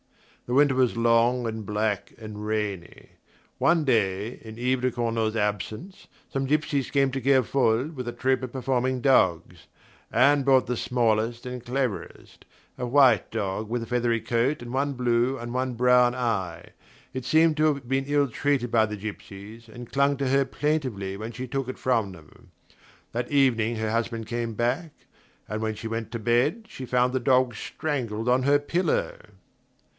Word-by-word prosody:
The 120 Hz, -, -2 dB
winter 145 Hz, 0 st, +5 dB
was 130 Hz, -3 st, +2 dB
long 115 Hz, +1 st, +3 dB
and 110 Hz, -1 st, -4 dB
black 105 Hz, -1 st, -2 dB
and 105 Hz, -2 st, -8 dB
rainy. 105 Hz, -5 st, -4 dB, 0.5 s
One 165 Hz, -2 st, +3 dB
day, 105 Hz, -2 st, 0 dB
in 110 Hz, 0 st, -10 dB
Yves 125 Hz, +1 st, 0 dB
de 130 Hz, 0 st, +1 dB
Cornault's 115 Hz, -2 st, -1 dB
absence, 105 Hz, -, -3 dB, 0.2 s
some 135 Hz, 0 st, -2 dB
gypsies 145 Hz, -2 st, 0 dB
came 140 Hz, -1 st, +3 dB
to 135 Hz, +1 st, -3 dB
Kerfol 130 Hz, 0 st, +2 dB
with 125 Hz, -2 st, -5 dB
a -, -, -2 dB
troop 130 Hz, +1 st, 0 dB
of 130 Hz, -, -5 dB
performing 130 Hz, 0 st, -1 dB
dogs. 95 Hz, -, +2 dB, 0.4 s
Anne 140 Hz, +5 st, +4 dB
bought 130 Hz, -3 st, +4 dB
the 125 Hz, -, -2 dB
smallest 115 Hz, 0 st, 0 dB
and 125 Hz, -1 st, -6 dB
cleverest, 125 Hz, -3 st, -4 dB, 0.3 s
a 125 Hz, -, -3 dB
white 125 Hz, -5 st, +4 dB
dog 105 Hz, -1 st, -3 dB
with 120 Hz, 0 st, -2 dB
a -, -, -5 dB
feathery 120 Hz, -1 st, 0 dB
coat 120 Hz, +6 st, 0 dB
and 120 Hz, +1 st, -8 dB
one 140 Hz, +2 st, 0 dB
blue 125 Hz, +1 st, +1 dB
and 120 Hz, -1 st, -6 dB
one 130 Hz, -1 st, -1 dB
brown 125 Hz, 0 st, +4 dB
eye. 95 Hz, -9 st, -3 dB, 0.4 s
It 130 Hz, -1 st, -4 dB
seemed 160 Hz, +4 st, +3 dB
to 155 Hz, -, +3 dB
have 140 Hz, -3 st, -9 dB
been 135 Hz, +1 st, 0 dB
ill 145 Hz, -1 st, +2 dB
treated 130 Hz, -1 st, -1 dB
by 110 Hz, -1 st, +3 dB
the 105 Hz, 0 st, -5 dB
gypsies, 105 Hz, +2 st, -9 dB
and 120 Hz, +1 st, -10 dB
clung 140 Hz, +1 st, +2 dB
to 135 Hz, 0 st, -1 dB
her 135 Hz, +1 st, +3 dB
plaintively 130 Hz, -10 st, -2 dB
when 110 Hz, +3 st, -6 dB
she 125 Hz, +2 st, -6 dB
took 135 Hz, 0 st, -3 dB
it 130 Hz, -, -5 dB
from 115 Hz, -6 st, 0 dB
them. 80 Hz, -4 st, -17 dB, 0.6 s
That 120 Hz, +3 st, -3 dB
evening 120 Hz, -5 st, +2 dB
her 110 Hz, -1 st, -2 dB
husband 115 Hz, 0 st, -2 dB
came 115 Hz, -2 st, -3 dB
back, 120 Hz, +9 st, -1 dB, 0.6 s
and 105 Hz, +1 st, -4 dB
when 110 Hz, -1 st, -2 dB
she 115 Hz, -, -6 dB
went 115 Hz, 0 st, -4 dB
to 115 Hz, -, -4 dB
bed 125 Hz, -, +1 dB
she 130 Hz, -, -8 dB
found 125 Hz, +1 st, +2 dB
the 130 Hz, -, +1 dB
dog 130 Hz, 0 st, +3 dB
strangled 120 Hz, -6 st, -3 dB
on 125 Hz, +1 st, +3 dB
her 140 Hz, +2 st, +4 dB
pillow. 185 Hz, -, -1 dB
120 Hz, 175 wpm, -26 LUFS, 110-135 Hz, 0.6 s, winter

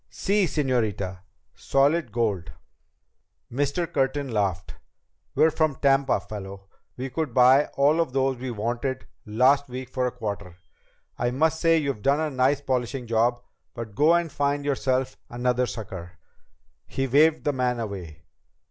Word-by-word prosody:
"Sí, 200 Hz, 0 st, +1 dB
señorita. 110 Hz, -, -1 dB, 0.3 s
Solid 140 Hz, -1 st, +1 dB
gold." 100 Hz, -8 st, -1 dB, 1.0 s
Mr. 140 Hz, +7 st, 0 dB
Curtin 135 Hz, 0 st, 0 dB
laughed. 100 Hz, -5 st, -1 dB, 0.6 s
"We're 160 Hz, -, +4 dB
from 155 Hz, -2 st, +1 dB
Tampa, 135 Hz, -3 st, +2 dB
fellow. 100 Hz, 0 st, -9 dB, 0.3 s
We 130 Hz, +1 st, -5 dB
could 145 Hz, -3 st, -3 dB
buy 130 Hz, +3 st, +6 dB
all 145 Hz, +4 st, +4 dB
of 160 Hz, -6 st, -2 dB
those 135 Hz, 0 st, +1 dB
we 130 Hz, +1 st, -5 dB
wanted 120 Hz, +4 st, -3 dB, 0.2 s
last 130 Hz, +6 st, +3 dB
week 125 Hz, 0 st, -6 dB
for 130 Hz, -1 st, -1 dB
a -, -, -2 dB
quarter. 100 Hz, -7 st, -6 dB, 0.6 s
I 120 Hz, -, +1 dB
must 160 Hz, +5 st, +1 dB
say 165 Hz, -1 st, +4 dB
you've 140 Hz, -8 st, -2 dB
done 140 Hz, +6 st, +2 dB
a 155 Hz, -1 st, -1 dB
nice 135 Hz, +2 st, +2 dB
polishing 130 Hz, -1 st, -2 dB
job. 120 Hz, +2 st, +1 dB, 0.3 s
But 115 Hz, -3 st, -7 dB
go 155 Hz, +9 st, +4 dB
and 170 Hz, -2 st, 0 dB
find 145 Hz, 0 st, -1 dB
yourself 130 Hz, -2 st, 0 dB
another 125 Hz, +1 st, 0 dB
sucker." 95 Hz, -6 st, -7 dB, 0.7 s
He 135 Hz, -, -2 dB
waved 150 Hz, +5 st, +4 dB
the 145 Hz, -, +1 dB
man 125 Hz, -2 st, 0 dB
away. 90 Hz, -8 st, -6 dB
130 Hz, 145 wpm, -25 LUFS, 115-140 Hz, 1.0 s, buy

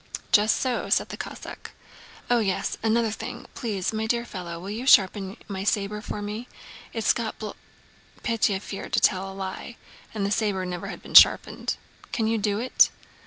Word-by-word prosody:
"Just 210 Hz, +1 st, +5 dB
so," 255 Hz, -2 st, -1 dB
said -, -, +2 dB
the -, -, -5 dB
Cossack. -, -, -8 dB, 0.5 s
"Oh 245 Hz, -1 st, +3 dB
yes, 195 Hz, -4 st, -1 dB
another 225 Hz, 0 st, +2 dB
thing! -, -, -6 dB
Please, 210 Hz, -4 st, -2 dB
my 220 Hz, 0 st, -1 dB
dear 235 Hz, +1 st, 0 dB
fellow, 175 Hz, -5 st, -6 dB
will 190 Hz, +3 st, -6 dB
you 235 Hz, +5 st, -5 dB
sharpen 195 Hz, -3 st, +4 dB
my 195 Hz, -2 st, -4 dB
saber 205 Hz, +1 st, 0 dB
for 210 Hz, -1 st, -5 dB
me? 215 Hz, +4 st, -5 dB, 0.4 s
It's 225 Hz, -2 st, +2 dB
got 225 Hz, -2 st, -4 dB
bl..." 215 Hz, -1 st, -5 dB, 0.7 s
(Pétya 220 Hz, -5 st, +1 dB
feared 195 Hz, -, -7 dB
to -, -, +4 dB
tell 190 Hz, 0 st, +2 dB
a -, -, -10 dB
lie, 195 Hz, +5 st, -6 dB, 0.3 s
and 210 Hz, -3 st, -2 dB
the 200 Hz, -, -1 dB
saber 205 Hz, -3 st, 0 dB
never 180 Hz, -1 st, -5 dB
had -, -, -8 dB
been -, -, -11 dB
sharpened.) -, -, +6 dB, 0.3 s
"Can 225 Hz, -, 0 dB
you 225 Hz, 0 st, +1 dB
do 205 Hz, -1 st, 0 dB
it?" 250 Hz, +4 st, +4 dB
210 Hz, 180 wpm, -25 LUFS, 195-225 Hz, 0.7 s, sharpened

